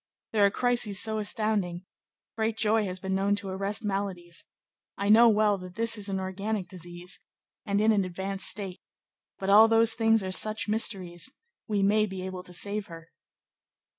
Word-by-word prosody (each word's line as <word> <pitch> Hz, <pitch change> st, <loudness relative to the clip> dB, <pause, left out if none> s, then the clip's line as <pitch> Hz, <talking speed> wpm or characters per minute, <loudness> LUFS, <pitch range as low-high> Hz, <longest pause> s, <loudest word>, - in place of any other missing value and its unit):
there 210 Hz, -2 st, +2 dB
are 200 Hz, -, +6 dB
crises 235 Hz, -3 st, +1 dB
so 220 Hz, -1 st, +2 dB
astounding; 205 Hz, -4 st, -1 dB, 0.5 s
great 220 Hz, 0 st, -1 dB
joy 220 Hz, 0 st, +2 dB
has 185 Hz, -1 st, -5 dB
been 190 Hz, 0 st, -3 dB
known 195 Hz, +1 st, +1 dB
to 205 Hz, -1 st, -3 dB
arrest 195 Hz, +3 st, -2 dB
maladies; 195 Hz, -4 st, -3 dB, 0.5 s
I 200 Hz, +1 st, -1 dB
know 230 Hz, +2 st, +7 dB
well 210 Hz, -2 st, +2 dB
that 180 Hz, -1 st, -10 dB
this 230 Hz, +1 st, -1 dB
is 205 Hz, -2 st, -4 dB
an 190 Hz, -1 st, -2 dB
organic 190 Hz, +1 st, -3 dB
disease, 175 Hz, 0 st, -8 dB, 0.5 s
and 200 Hz, 0 st, +1 dB
in 220 Hz, +1 st, +4 dB
an 205 Hz, -3 st, +2 dB
advanced 190 Hz, +1 st, -4 dB
state, 195 Hz, -3 st, -4 dB, 0.6 s
but 195 Hz, 0 st, -1 dB
all 215 Hz, +2 st, +8 dB
those 225 Hz, 0 st, +4 dB
things 225 Hz, -2 st, +2 dB
are 185 Hz, -, -4 dB
such 215 Hz, +4 st, +1 dB
mysteries: 195 Hz, -1 st, +1 dB, 0.4 s
we 205 Hz, -3 st, 0 dB
may 215 Hz, +2 st, +3 dB
be 190 Hz, -1 st, -6 dB
able 185 Hz, -1 st, -6 dB
to 180 Hz, -, -10 dB
save 205 Hz, +3 st, -1 dB
her." 165 Hz, -1 st, -12 dB
200 Hz, 175 wpm, -27 LUFS, 185-215 Hz, 0.6 s, all